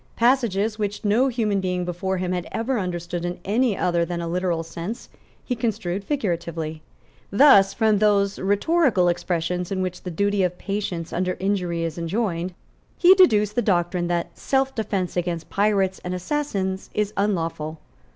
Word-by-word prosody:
Passages, 230 -4 +2
which 205 0 -3
no 225 +6 +3
human 220 -6 0
being 180 -1 -1
before 185 +2 -2
him 180 0 -2
had 180 -1 -2
ever 230 +2 -1
understood 175 -2 -3
in 175 0 -3
any 220 0 +1
other 175 -1 +1
than 170 0 -3
a 170 - -3
literal 175 -1 -1
sense, 170 +8 -6 0.4
he 250 - -1
construed 210 -5 -2
figuratively. 170 - -3 0.5
Thus, 200 -4 +6
from 220 -3 +3
those 200 -2 +2
rhetorical 205 - +2
expressions 175 +1 -2
in 190 - -1
which 180 -1 -4
the 180 - -6
duty 200 +4 0
of 180 -1 0
patience 195 -5 -4
under 185 +1 -1
injuries 180 -4 -1
is 165 0 -4
enjoined 180 -1 -2 0.4
he 360 +1 +7
deduced 215 - +4
the 240 - +1
doctrine 175 -3 +1
that 175 -1 -2
selfdefence 225 -9 -1
against 170 -2 -3
pirates 195 -2 +1
and 180 0 -3
assassins 190 -3 -2
is 210 0 0
unlawful. 165 -6 -1
190 Hz, 155 wpm, -23 LUFS, 175-210 Hz, 0.5 s, he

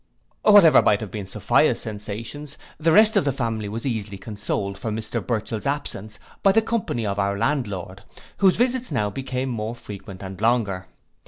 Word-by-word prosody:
Whatever 205 -7 +7
might 100 - +3
have 110 -4 -6
been 105 -3 -5
Sophia's 95 - +2
sensations, 115 +8 -6 0.2
the 165 +1 +3
rest 215 +5 +6
of - - +4
the 140 - +1
family 115 -5 -2
was 115 +4 -5
easily 105 -6 -3
consoled, 100 0 -3
for 110 - -3
Mr 110 0 -3
Burchell's 115 +1 -2
absence 110 -7 -4 0.2
by 195 - +5
the 225 - +6
company 215 - -2
of 100 0 -2
our 100 0 0
landlord, 100 - -2 0.4
whose 190 -2 +4
visits 250 0 0
now 105 -7 0
became 130 +1 -3
more 115 -1 -3
frequent 100 -4 -9
and 95 0 -8
longer. 110 -5 +1
110 Hz, 170 wpm, -23 LUFS, 100-140 Hz, 0.4 s, Whatever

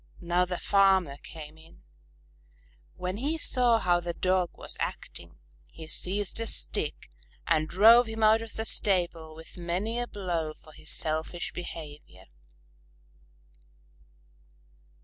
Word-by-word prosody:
Now 175 +1 +1
the 180 0 -3
farmer 190 -8 +3
came 155 -1 -9
in. 165 +1 -18 1.1
When 185 +2 -4
he 290 +7 -1
saw 245 -6 +4
how 175 -5 +2
the 170 -1 -4
Dog 185 -1 +1
was - - -3
acting, - - -6 0.3
he 160 - -10
seized 195 +5 -1
a 230 - -2
stick - - -3 0.3
and 155 -1 +2
drove 225 +6 +7
him 225 0 -3
out 220 +1 +5
of 225 -1 -8
the 220 - -4
stable 170 -7 0
with 160 +2 -12
many 185 +7 -2
a 245 - -2
blow 170 -7 -3
for 155 - -18
his - - -9
selfish 160 +2 -2
behavior. 150 - -9
180 Hz, 130 wpm, -28 LUFS, 160-215 Hz, 1.1 s, drove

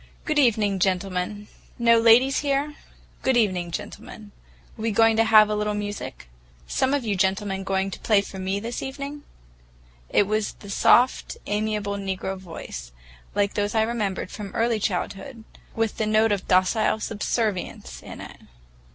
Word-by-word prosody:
"Good 305 -2 +1
evening, 210 -7 +2
gentlemen. 190 +2 -1 0.3
No 235 -1 +5
ladies 240 +4 +5
here? 285 +1 0 0.5
Good 265 -2 +2
evening, 185 -6 +1
gentlemen. 210 +4 -8 0.4
We 225 0 -2
going 225 +1 +4
to 225 - +5
have 215 -1 +7
a 215 - -1
little 210 0 -1
music? 205 - -5 0.4
Some 265 - +1
of 275 -4 -2
you 205 -2 0
gentlemen 195 +1 0
going 190 0 -1
to - - -7
play 210 -3 +3
for 195 -1 -9
me 190 +1 -1
this 230 +3 -5
evening?" 280 +2 -6 0.9
It 205 - +3
was 215 +1 -1
the 200 - -11
soft, 245 +5 +3
amiable 210 -1 -1
negro 195 -1 -3
voice, 165 - -8 0.4
like 205 -1 +1
those 205 +1 -1
I 220 - +4
remembered 215 -5 -2
from 200 -2 -8
early 230 -1 +1
childhood, 210 +5 -3 0.3
with 225 -1 -1
the 220 - 0
note 215 +1 +3
of 200 -2 -1
docile 185 +4 +2
subservience 205 - -3
in - - -10
it. - - -10
210 Hz, 155 wpm, -24 LUFS, 195-230 Hz, 0.9 s, have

